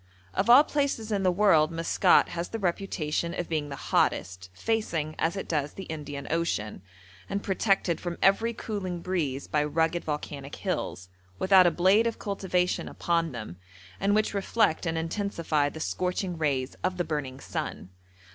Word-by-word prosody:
Of 205 Hz, -, 0 dB
all 255 Hz, +5 st, +9 dB
places 280 Hz, -8 st, -1 dB
in 200 Hz, -2 st, +1 dB
the 185 Hz, -, +3 dB
world 175 Hz, -5 st, +4 dB
Maskat 165 Hz, 0 st, +3 dB
has 170 Hz, +1 st, -4 dB
the 225 Hz, -, -3 dB
reputation 170 Hz, -4 st, -2 dB
of 175 Hz, -, -2 dB
being 155 Hz, -3 st, -2 dB
the 140 Hz, -, -5 dB
hottest, 90 Hz, -7 st, 0 dB
facing, 165 Hz, -, -1 dB
as 165 Hz, +4 st, +1 dB
it 195 Hz, -, -4 dB
does, 150 Hz, -3 st, -1 dB
the 195 Hz, -, -7 dB
Indian 145 Hz, -4 st, -6 dB
Ocean, 160 Hz, -, -1 dB, 0.5 s
and 200 Hz, +1 st, -2 dB
protected 195 Hz, -3 st, +1 dB
from 175 Hz, -1 st, -4 dB
every 210 Hz, +4 st, +3 dB
cooling 195 Hz, -6 st, -4 dB
breeze 155 Hz, -7 st, -2 dB
by 150 Hz, -1 st, +1 dB
rugged 160 Hz, +3 st, 0 dB
volcanic 145 Hz, -2 st, -5 dB
hills, 95 Hz, -, -3 dB, 0.3 s
without 190 Hz, -, +6 dB
a -, -, +6 dB
blade 190 Hz, +7 st, +4 dB
of 230 Hz, -, -2 dB
cultivation 185 Hz, -3 st, -1 dB
upon 165 Hz, -2 st, 0 dB
them, 110 Hz, -8 st, -7 dB, 0.4 s
and 200 Hz, +1 st, +2 dB
which 215 Hz, 0 st, +1 dB
reflect 200 Hz, -3 st, +1 dB
and 165 Hz, 0 st, -1 dB
intensify 165 Hz, -4 st, 0 dB
the 160 Hz, -, -9 dB
scorching 180 Hz, +2 st, -2 dB
rays 140 Hz, -5 st, -1 dB
of 185 Hz, 0 st, 0 dB
the 175 Hz, -, +1 dB
burning 145 Hz, -5 st, -4 dB
sun. 95 Hz, -, -5 dB
170 Hz, 165 wpm, -28 LUFS, 150-195 Hz, 0.5 s, all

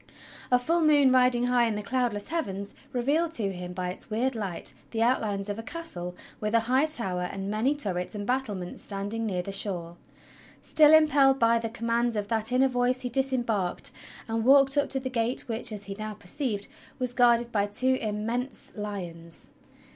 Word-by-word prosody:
A 250 Hz, -, +6 dB
full 330 Hz, +7 st, 0 dB
moon 290 Hz, -4 st, +5 dB
riding 250 Hz, -1 st, +3 dB
high 245 Hz, -1 st, +3 dB
in 220 Hz, -, -2 dB
the 210 Hz, -, -4 dB
cloudless 235 Hz, -2 st, -1 dB
heavens 200 Hz, -, -2 dB, 0.2 s
revealed 290 Hz, +7 st, 0 dB
to 200 Hz, -7 st, -1 dB
him 180 Hz, 0 st, -7 dB
by 180 Hz, 0 st, -3 dB
its 185 Hz, -, -2 dB
weird 240 Hz, +5 st, 0 dB
light 200 Hz, -7 st, -3 dB, 0.2 s
the 225 Hz, -1 st, 0 dB
outlines 210 Hz, -5 st, 0 dB
of 205 Hz, +1 st, -4 dB
a -, -, -3 dB
castle 185 Hz, -, -4 dB, 0.2 s
with 210 Hz, +1 st, -1 dB
a 230 Hz, -, +4 dB
high 260 Hz, +6 st, +2 dB
tower 195 Hz, -12 st, -2 dB
and 195 Hz, +1 st, -5 dB
many 235 Hz, +7 st, +1 dB
turrets 190 Hz, -8 st, -2 dB
and 205 Hz, -1 st, -4 dB
battlements 215 Hz, -8 st, -3 dB
standing 205 Hz, +3 st, -3 dB
near 180 Hz, -3 st, -2 dB
the 195 Hz, -, -6 dB
shore. 175 Hz, -4 st, -1 dB, 0.6 s
Still 305 Hz, -1 st, +6 dB
impelled 290 Hz, -4 st, +5 dB
by 230 Hz, -1 st, +3 dB
the 225 Hz, 0 st, -3 dB
commands 235 Hz, +1 st, -1 dB
of 205 Hz, -1 st, -3 dB
that 225 Hz, 0 st, +2 dB
inner 260 Hz, +2 st, +4 dB
voice 250 Hz, 0 st, 0 dB
he 250 Hz, -, -3 dB
disembarked 240 Hz, -7 st, 0 dB, 0.4 s
and 225 Hz, 0 st, -1 dB
walked 275 Hz, +2 st, +5 dB
up 285 Hz, -, +1 dB
to 270 Hz, -, 0 dB
the 260 Hz, -, -5 dB
gate 240 Hz, 0 st, 0 dB
which, 230 Hz, 0 st, -1 dB
as 210 Hz, -1 st, -7 dB
he 200 Hz, 0 st, -6 dB
now 215 Hz, +1 st, -6 dB
perceived, 205 Hz, +1 st, -3 dB, 0.3 s
was 250 Hz, -2 st, -2 dB
guarded 240 Hz, -1 st, +3 dB
by 205 Hz, -2 st, +1 dB
two 260 Hz, +5 st, +1 dB
immense 230 Hz, +5 st, -3 dB
lions. 175 Hz, -6 st, -2 dB
230 Hz, 185 wpm, -27 LUFS, 205-255 Hz, 0.6 s, A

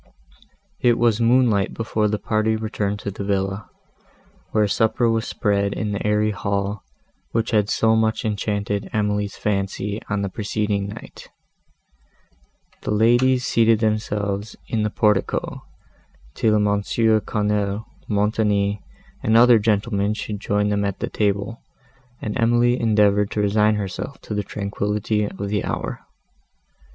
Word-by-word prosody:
It 120 Hz, -1 st, +3 dB
was 115 Hz, -1 st, +2 dB
moonlight 115 Hz, -4 st, +3 dB
before 110 Hz, -1 st, 0 dB
the 105 Hz, 0 st, -1 dB
party 110 Hz, +1 st, 0 dB
returned 105 Hz, -2 st, -2 dB
to 100 Hz, -, -4 dB
the 100 Hz, -, -6 dB
villa, 95 Hz, +1 st, -2 dB, 0.8 s
where 105 Hz, -1 st, +2 dB
supper 110 Hz, +3 st, +1 dB
was 115 Hz, 0 st, 0 dB
spread 100 Hz, -3 st, 0 dB
in 105 Hz, -2 st, -3 dB
the 100 Hz, -, -3 dB
airy 105 Hz, 0 st, +2 dB
hall, 100 Hz, 0 st, -2 dB, 0.5 s
which 115 Hz, +1 st, 0 dB
had 105 Hz, -2 st, +2 dB
so 110 Hz, 0 st, +3 dB
much 110 Hz, 0 st, +1 dB
enchanted 105 Hz, -1 st, -2 dB
Emily's 105 Hz, -1 st, -1 dB
fancy, 100 Hz, +1 st, -2 dB
on 105 Hz, -1 st, -1 dB
the -, -, -1 dB
preceding 105 Hz, -1 st, -2 dB
night. 105 Hz, +3 st, -10 dB, 1.5 s
The -, -, -5 dB
ladies 120 Hz, +4 st, +3 dB
seated 115 Hz, -1 st, +3 dB
themselves 105 Hz, -2 st, -1 dB
in 110 Hz, -, -1 dB
the 105 Hz, -, +1 dB
portico, 105 Hz, -2 st, 0 dB, 0.7 s
till 110 Hz, +4 st, +2 dB
Mons. 105 Hz, -1 st, 0 dB
Quesnel, 105 Hz, -2 st, +1 dB, 0.2 s
Montoni, 105 Hz, -1 st, +1 dB, 0.4 s
and 110 Hz, +1 st, +3 dB
other 120 Hz, -1 st, +7 dB
gentlemen 105 Hz, -1 st, 0 dB
should 105 Hz, -1 st, -5 dB
join 105 Hz, 0 st, 0 dB
them 100 Hz, 0 st, 0 dB
at 100 Hz, -1 st, -2 dB
table, 105 Hz, +3 st, -1 dB, 0.6 s
and 105 Hz, -, -4 dB
Emily 120 Hz, +1 st, +3 dB
endeavoured 105 Hz, -2 st, +3 dB
to -, -, -3 dB
resign 105 Hz, +1 st, +3 dB
herself 100 Hz, +6 st, -5 dB
to -, -, -6 dB
the 105 Hz, -, 0 dB
tranquillity 105 Hz, +1 st, -2 dB
of 100 Hz, 0 st, -5 dB
the 105 Hz, 0 st, -1 dB
hour. -, -, -4 dB
105 Hz, 135 wpm, -22 LUFS, 100-110 Hz, 1.5 s, other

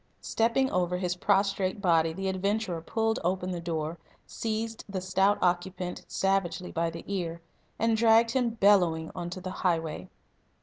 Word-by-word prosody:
Stepping 235 Hz, +4 st, +1 dB
over 180 Hz, 0 st, 0 dB
his 180 Hz, -1 st, -1 dB
prostrate 195 Hz, 0 st, +1 dB
body 165 Hz, -4 st, +3 dB
the 195 Hz, +4 st, -4 dB
adventurer 190 Hz, -1 st, -1 dB
pulled 225 Hz, +5 st, 0 dB
open 185 Hz, +1 st, -1 dB
the 175 Hz, -1 st, -4 dB
door, 165 Hz, -1 st, -3 dB, 0.3 s
seized 225 Hz, 0 st, -3 dB
the 195 Hz, -1 st, -2 dB
stout 190 Hz, +2 st, +2 dB
occupant 180 Hz, 0 st, -1 dB
savagely 195 Hz, -2 st, 0 dB
by 165 Hz, 0 st, 0 dB
the 165 Hz, 0 st, -8 dB
ear, 175 Hz, -4 st, -3 dB, 0.4 s
and 225 Hz, 0 st, +2 dB
dragged 230 Hz, 0 st, +5 dB
him 250 Hz, -1 st, +1 dB
bellowing 190 Hz, -7 st, +3 dB
on 175 Hz, -, -5 dB
to 185 Hz, -, -6 dB
the 185 Hz, 0 st, -6 dB
highway. 165 Hz, -4 st, -1 dB
185 Hz, 150 wpm, -28 LUFS, 175-205 Hz, 0.4 s, dragged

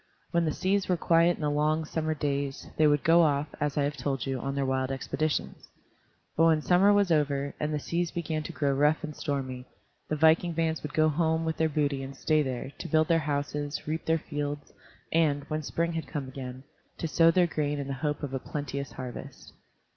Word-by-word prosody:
When 170 Hz, -1 st, +2 dB
the 155 Hz, -, +1 dB
seas 190 Hz, +4 st, 0 dB
were 180 Hz, -, +2 dB
quiet 170 Hz, +1 st, +4 dB
in -, -, -11 dB
the 150 Hz, -, +1 dB
long, 155 Hz, +2 st, +1 dB
summer 155 Hz, 0 st, -2 dB
days, 140 Hz, -2 st, -2 dB
they 155 Hz, -, +4 dB
would 145 Hz, -1 st, +2 dB
go 165 Hz, +1 st, +6 dB
off, 145 Hz, -2 st, +2 dB
as 145 Hz, -1 st, -1 dB
I 145 Hz, -, +3 dB
have 145 Hz, +1 st, -1 dB
told 135 Hz, -1 st, -2 dB
you, 135 Hz, -1 st, -2 dB
on 135 Hz, +2 st, -3 dB
their 140 Hz, -1 st, 0 dB
wild 130 Hz, 0 st, 0 dB
expeditions. 140 Hz, +3 st, -2 dB, 0.7 s
But 165 Hz, -, +4 dB
when 160 Hz, -2 st, +3 dB
summer 185 Hz, +3 st, +5 dB
was 200 Hz, -3 st, +3 dB
over, 140 Hz, -2 st, +1 dB
and 150 Hz, 0 st, -1 dB
the 150 Hz, -, 0 dB
seas 170 Hz, +3 st, -1 dB
began 160 Hz, -2 st, -3 dB
to -, -, -6 dB
grow 140 Hz, -2 st, 0 dB
rough 150 Hz, +3 st, +2 dB
and 150 Hz, -1 st, -5 dB
stormy, 130 Hz, -3 st, -3 dB, 0.4 s
the 155 Hz, -, 0 dB
viking 160 Hz, +3 st, +4 dB
bands 160 Hz, -1 st, 0 dB
would 150 Hz, -, -6 dB
go 155 Hz, 0 st, +4 dB
home 160 Hz, +1 st, +1 dB
with 160 Hz, 0 st, -2 dB
their 160 Hz, 0 st, +2 dB
booty 145 Hz, -2 st, 0 dB
and 135 Hz, 0 st, -7 dB
stay 155 Hz, +1 st, +2 dB
there, 130 Hz, -1 st, -3 dB
to -, -, -5 dB
build 155 Hz, 0 st, +2 dB
their 165 Hz, -1 st, +4 dB
houses, 145 Hz, -1 st, -3 dB
reap 160 Hz, +1 st, -2 dB
their 165 Hz, 0 st, +3 dB
fields, 145 Hz, -1 st, -5 dB, 0.4 s
and, 150 Hz, -3 st, +2 dB
when 155 Hz, 0 st, -1 dB
spring 170 Hz, +3 st, -1 dB
had 160 Hz, -2 st, -4 dB
come 140 Hz, -3 st, -4 dB
again, 130 Hz, -1 st, -7 dB, 0.3 s
to 165 Hz, -, -2 dB
sow 165 Hz, +1 st, +5 dB
their 175 Hz, +1 st, +4 dB
grain 150 Hz, -3 st, -1 dB
in 140 Hz, -, -3 dB
the 140 Hz, -, -2 dB
hope 150 Hz, +2 st, -2 dB
of 135 Hz, -2 st, -4 dB
a 135 Hz, -, -1 dB
plenteous 140 Hz, 0 st, -5 dB
harvest. 125 Hz, -2 st, -8 dB
150 Hz, 220 wpm, -28 LUFS, 140-160 Hz, 0.7 s, go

